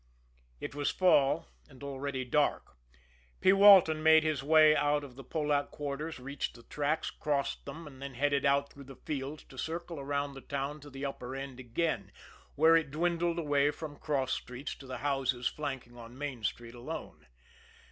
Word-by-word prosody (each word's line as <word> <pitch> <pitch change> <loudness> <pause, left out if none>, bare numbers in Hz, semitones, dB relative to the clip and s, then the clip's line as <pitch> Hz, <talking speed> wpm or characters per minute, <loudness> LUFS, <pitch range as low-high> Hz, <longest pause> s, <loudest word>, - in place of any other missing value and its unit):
It - - -6
was 145 0 0
fall, 145 -7 +3 0.2
and 135 0 -14
already 140 -1 -4
dark. 145 +4 0 0.6
P. 190 - +5
Walton 195 -6 +7
made 160 0 +6
his 155 -4 0
way 155 +1 +6
out 145 0 +2
of 130 -3 -10
the 135 - -10
Polack 145 +1 0
quarters, 145 +1 -5
reached 140 +2 -4
the 120 - -14
tracks, 150 +4 -1
crossed 140 -2 -2
them 160 +4 -7
and 135 -3 -12
then 140 -2 -6
headed 140 +2 +1
out 140 0 +2
through 140 -1 -12
the 135 0 -11
fields 145 +1 -5
to 130 - -12
circle 165 +3 -4
around 140 0 -2
the 135 - -10
town 140 +2 -4
to 145 0 -12
the 135 +1 -6
upper 130 -2 -5
end 135 -2 -6
again, 130 +7 -2 0.4
where 160 +2 +6
it 160 -3 +2
dwindled 170 +2 0
away 145 -3 +2
from 150 0 -6
cross 135 -4 0
streets 125 +3 -5
to 135 - -12
the 130 -1 -5
houses 135 -3 0
flanking 135 -5 -3
on 120 +1 -11
Main 135 -5 -5
Street 115 +2 -3
alone. 120 - -8
140 Hz, 180 wpm, -31 LUFS, 135-155 Hz, 0.6 s, Walton